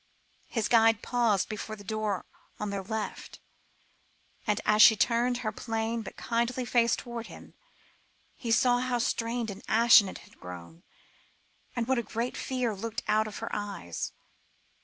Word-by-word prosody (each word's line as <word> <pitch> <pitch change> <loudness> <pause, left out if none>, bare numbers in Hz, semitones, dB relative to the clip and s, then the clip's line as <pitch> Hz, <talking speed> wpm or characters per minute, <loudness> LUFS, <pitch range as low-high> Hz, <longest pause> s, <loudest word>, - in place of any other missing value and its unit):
His 225 -3 -1
guide 225 -2 +4
paused 230 -5 +1
before 215 0 -5
a 205 - -12
door 210 -2 -2 0.3
on 210 -1 -3
their 200 -1 -2
left, 215 +2 -5 1.1
and 210 0 +2
as 215 0 +4
she 220 - +9
turned 240 +3 +2
her 215 - 0
plain 225 +1 -2
but - - -9
kindly 235 +2 -1
face 235 -1 +3
towards 235 -1 -7
him, - - -12 0.8
he 235 - -6
saw 245 +2 +4
how 250 -1 0
strained 230 -1 -1
and 195 - -9
ashen 220 -3 +6
it - - -8
had - - -21
grown, 90 - -10 0.9
and 235 -2 -1
what 260 -1 +2
a - - +1
great 230 +3 -3
fear 250 -4 -1
looked 225 +3 -5
out 215 0 +2
of 210 - -7
her - - -4
eyes. 200 - -4
225 Hz, 160 wpm, -29 LUFS, 210-235 Hz, 1.1 s, she